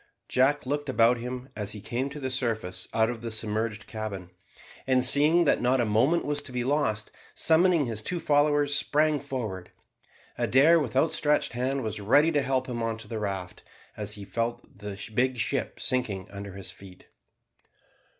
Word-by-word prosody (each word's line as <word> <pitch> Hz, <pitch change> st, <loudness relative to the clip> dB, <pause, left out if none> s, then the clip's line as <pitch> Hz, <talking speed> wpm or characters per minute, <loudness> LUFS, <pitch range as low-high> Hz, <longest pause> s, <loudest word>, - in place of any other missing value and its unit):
Jack 135 Hz, +3 st, +2 dB
looked 145 Hz, +1 st, -2 dB
about 120 Hz, -1 st, +4 dB
him 125 Hz, +2 st, -6 dB
as 105 Hz, -1 st, -3 dB
he 105 Hz, -, -8 dB
came 120 Hz, +6 st, -3 dB
to 145 Hz, +2 st, -8 dB
the 130 Hz, -2 st, -3 dB
surface 110 Hz, -8 st, -2 dB
out 110 Hz, 0 st, +2 dB
of 120 Hz, -1 st, -5 dB
the 115 Hz, -, -4 dB
submerged 110 Hz, -1 st, -1 dB
cabin, 105 Hz, -5 st, -6 dB, 0.6 s
and 130 Hz, -1 st, +3 dB
seeing 150 Hz, +6 st, +6 dB
that -, -, +2 dB
not 125 Hz, +2 st, +2 dB
a 120 Hz, -, +2 dB
moment 125 Hz, +11 st, +2 dB
was 145 Hz, 0 st, -2 dB
to 140 Hz, -, -11 dB
be 125 Hz, -1 st, -2 dB
lost, 120 Hz, -6 st, 0 dB, 0.2 s
summoning 165 Hz, -1 st, +3 dB
his 110 Hz, -3 st, -3 dB
two 175 Hz, +10 st, -2 dB
followers, 145 Hz, -1 st, +2 dB
sprang 150 Hz, 0 st, +1 dB
forward. 115 Hz, -10 st, -5 dB, 0.7 s
Adair, 155 Hz, +6 st, +5 dB
with 130 Hz, -6 st, -4 dB
outstretched 150 Hz, 0 st, +2 dB
hand, 130 Hz, +2 st, -1 dB
was 110 Hz, -1 st, -3 dB
ready 145 Hz, +10 st, +4 dB
to 145 Hz, -3 st, +2 dB
help 130 Hz, -1 st, 0 dB
him 120 Hz, -2 st, -4 dB
on 115 Hz, -1 st, -2 dB
to 115 Hz, -1 st, -9 dB
the 110 Hz, 0 st, -4 dB
raft 95 Hz, -3 st, -5 dB, 0.3 s
as 105 Hz, 0 st, -4 dB
he 100 Hz, -1 st, -9 dB
felt 120 Hz, +3 st, -4 dB
the 100 Hz, -1 st, -7 dB
big 130 Hz, +3 st, +1 dB
ship -, -, -2 dB
sinking 110 Hz, -8 st, -1 dB
under 100 Hz, -1 st, -8 dB
his 100 Hz, 0 st, -6 dB
feet. 95 Hz, -2 st, -15 dB
125 Hz, 180 wpm, -27 LUFS, 110-145 Hz, 0.7 s, seeing